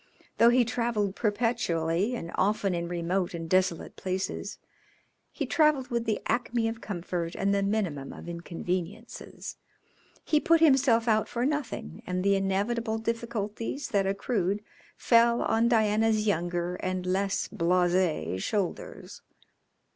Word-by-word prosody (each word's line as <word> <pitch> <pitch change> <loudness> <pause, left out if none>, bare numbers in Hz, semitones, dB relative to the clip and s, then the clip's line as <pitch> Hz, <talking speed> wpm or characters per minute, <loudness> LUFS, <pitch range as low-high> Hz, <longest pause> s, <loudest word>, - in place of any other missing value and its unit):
Though 230 - +7
he 245 0 +4
travelled 230 -4 -1
perpetually 205 -3 0
and 170 -7 -6
often 205 -1 +1
in 170 0 -2
remote 175 +1 -1
and 165 -1 -5
desolate 185 -1 +1
places, 185 0 -3 0.7
he - - -3
travelled 300 -5 +2
with 235 -1 -1
the 220 -2 0
acme 240 -1 0
of 225 0 -4
comfort 175 -3 -4
and 200 +1 +1
the 200 - +2
minimum 195 -9 -1
of - - -10
inconveniences. 175 +5 -5 0.7
He 305 - +3
put 330 +2 +4
himself 265 -7 +4
out 215 -1 +2
for 240 +1 -1
nothing, 270 - -3
and 180 0 -1
the 200 0 +4
inevitable 215 +4 0
difficulties 230 +2 -3
that 195 -2 +1
accrued 200 0 -1 0.3
fell 235 0 +4
on 225 +1 +2
Diana's 220 -1 +2
younger 175 -2 -1
and 185 0 -3
less 195 +2 0
blase 175 - +1
shoulders. 200 - -3
205 Hz, 130 wpm, -28 LUFS, 180-230 Hz, 0.7 s, Though